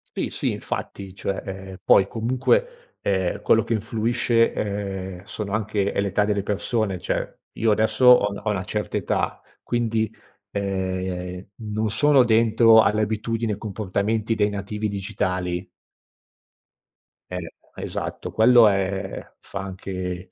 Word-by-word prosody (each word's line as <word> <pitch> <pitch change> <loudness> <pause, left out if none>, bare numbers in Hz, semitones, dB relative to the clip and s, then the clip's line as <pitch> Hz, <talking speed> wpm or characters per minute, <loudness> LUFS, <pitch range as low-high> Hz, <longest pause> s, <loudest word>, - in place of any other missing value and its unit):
Sì, - - -1
sì, - - -1
infatti, 95 -2 -5
cioè, 100 0 -3
ehm 95 0 -7
poi 95 - +5
comunque, 480 - -1
ehm, 95 -2 0
quello 115 -1 +4
che 115 - -2
influisce, 115 +1 +1
ehm, 95 -3 -4
sono 105 -2 -5
anche 105 -2 0
è - - -2
l’età 100 +1 +1
delle 105 -1 0
persone. 105 -2 -1
Cioè, - - -3
io 110 -1 +1
adesso 110 +4 +2
ho 125 -5 +7
una 100 0 -7
ho 110 - 0
una 100 -2 -2
certa 105 +1 -3
età, - - -1 0.2
quindi, 115 -2 0 0.4
ehm, 95 -2 -3 0.3
non 110 +1 0
sono 135 +4 +5
dentro 115 -1 +5
alle 105 +2 +2
abitudini, 110 +1 -1
ai - - -5
comportamenti 105 +2 -1
dei 105 -1 +2
nativi 105 +2 -3
digitali. 95 -3 -2 1.6
Eh, 90 -2 -5 0.2
esatto, - - -5
quello 115 0 +6
è 95 -1 -2
fa 100 - -7
anche 90 -1 -5
105 Hz, 135 wpm, -24 LUFS, 95-110 Hz, 1.6 s, ho